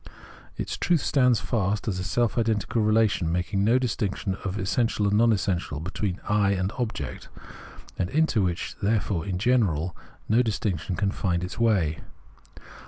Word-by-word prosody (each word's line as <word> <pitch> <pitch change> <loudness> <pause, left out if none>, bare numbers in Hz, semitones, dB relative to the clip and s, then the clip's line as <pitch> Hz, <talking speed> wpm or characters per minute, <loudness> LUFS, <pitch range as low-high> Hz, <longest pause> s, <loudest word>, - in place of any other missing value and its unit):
Its - - -3
truth 170 -4 +2
stands 125 -4 +3
fast 105 -1 -1
as 95 -4 -1
a - - -2
self 120 +4 0
identical 115 -1 0
relation 105 -6 +2
making 90 +3 0
no 115 +5 +4
distinction 105 -6 -1
of 100 0 -3
essential 105 +2 0
and 100 - +2
non 115 +2 +5
essential, 95 -7 -1
between 95 +3 -3
I 105 -2 +3
and 95 0 -1
object, 120 -3 -4 0.7
and 90 - 0
into 150 -5 +2
which, 90 -2 -2
therefore, 100 -4 0
in 95 -2 -2
general, 95 -8 +1 0.3
no 115 +3 +4
distinction 100 -6 -2
can 100 +3 0
find 90 -4 -1
its 90 - -6
way. 95 -10 +2
100 Hz, 155 wpm, -26 LUFS, 90-115 Hz, 0.7 s, non